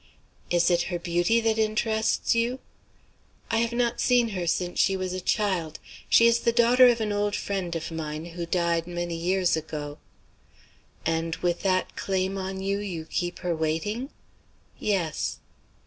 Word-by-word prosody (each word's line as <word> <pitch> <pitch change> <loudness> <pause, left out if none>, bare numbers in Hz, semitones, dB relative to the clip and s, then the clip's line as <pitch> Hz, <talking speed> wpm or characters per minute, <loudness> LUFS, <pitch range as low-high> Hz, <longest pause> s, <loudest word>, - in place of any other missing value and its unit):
"Is 175 0 +3
it 175 0 +3
her 175 - -1
beauty 175 +6 +1
that 225 -1 +1
interests 220 0 +1
you?" 235 +2 0 0.9
"I 225 - +2
have 230 +1 +1
not 235 0 0
seen 245 -2 +3
her 180 -4 -3
since 175 +1 -1
she 195 - +3
was 185 -1 -3
a 185 - -3
child. 180 -7 0 0.3
She 230 - +6
is 235 0 +5
the 235 - +2
daughter 240 +2 +6
of 240 -1 +3
an 215 -1 -1
old 205 0 0
friend 185 -4 -3
of 165 0 -4
mine, 155 -1 -4
who 170 -1 -4
died 170 -1 0
many 175 -1 -3
years 180 +1 +1
ago." 150 -2 -5 1.1
"And 165 0 0
with 175 -1 -1
that 185 -1 0
claim 190 0 -1
on 190 0 -4
you, 200 +1 0
you 180 -6 -5
keep 175 +2 -3
her 175 -1 +1
waiting?" 165 - -2 0.7
"Yes." 185 -7 -1
185 Hz, 165 wpm, -26 LUFS, 170-220 Hz, 1.1 s, She